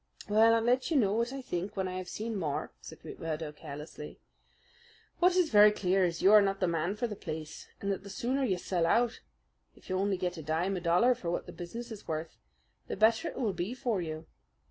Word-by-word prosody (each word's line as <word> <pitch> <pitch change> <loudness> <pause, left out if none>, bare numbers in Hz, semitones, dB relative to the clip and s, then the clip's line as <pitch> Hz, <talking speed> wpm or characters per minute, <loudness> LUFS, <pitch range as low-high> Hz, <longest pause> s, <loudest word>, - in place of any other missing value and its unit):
"Well, 220 +2 +5
I'll 225 - +1
let 250 +4 +2
you 320 - +2
know 205 -6 +3
what 235 +3 0
I 270 -1 -6
think 195 -1 -4
when 190 -1 0
I 185 0 -4
have 185 - -7
seen 225 +1 -4
more," 160 -8 -2
said - - -11
McMurdo 155 -2 -5
carelessly. 150 +1 -9 1.0
"What 360 +1 +4
is 360 -3 +2
very 210 -1 +8
clear 190 -2 +2
is 170 -2 -1
that - - -7
you 195 - +7
are 210 - +9
not 195 -1 0
the 185 - +1
man 170 +3 -1
for 225 - -2
the 215 -3 -4
place, 155 -4 -7
and 200 - -2
that 195 - -2
the 200 - -11
sooner 255 +7 -1
you 195 -8 +1
sell 175 -2 0
out 235 +5 +2 0.6
if - - -12
you 185 - +1
only 195 -1 +1
get 180 -1 -3
a - - -5
dime 165 +6 -1
a 180 - -3
dollar 180 +9 +4
for 210 -8 -5
what 175 - -2
the - - -9
business 230 +7 -7
is 215 - -9
worth 160 +1 -4 0.5
the - - -4
better 220 +1 +3
it - - -6
will 220 -6 0
be 180 +7 -3
for 240 -7 -1
you. 155 -1 -5
195 Hz, 235 wpm, -31 LUFS, 170-230 Hz, 1.0 s, are